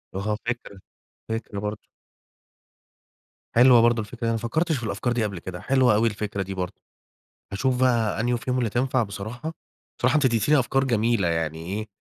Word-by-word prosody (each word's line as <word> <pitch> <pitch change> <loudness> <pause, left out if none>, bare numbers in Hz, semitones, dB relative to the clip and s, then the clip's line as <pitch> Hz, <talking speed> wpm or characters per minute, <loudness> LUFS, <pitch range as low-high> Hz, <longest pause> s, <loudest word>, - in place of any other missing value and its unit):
أها 105 +2 -1
فكرة، 120 -5 -4 0.5
فكرة 110 -2 -4
برضه. 105 0 -5 1.7
حلوة 120 0 +7
برضه 120 0 +3
الفكرة 115 +3 -10
دي - - -6
أنا 115 - +2
ما 115 - 0
فكّرتش 155 +8 0
في 120 - -7
الأفكار 110 +3 -1
دي 120 -2 0
قبل 100 -4 -3
كده، 90 +1 -7
حلوة 130 -4 +3
أوي 110 +2 +3
الفكرة 105 -2 -3
دي 95 +1 -6
برضه. 90 0 -4 0.8
هاشوف 125 +5 0
بقى 115 -5 +2
أنهو 120 +1 +1
فيهم 125 +2 -2
اللي 120 -3 0
تنفع 125 +2 +1
بصراحة، 110 +9 -5 0.5
بصراحة - - +2
أنتِ 150 -2 +3
اديتيني 125 +4 +3
أفكار 135 +1 +1
جميلة 115 -6 +1
يعني 80 -1 -1
إيه، 105 +4 -3
115 Hz, 175 wpm, -25 LUFS, 100-125 Hz, 1.7 s, حلوة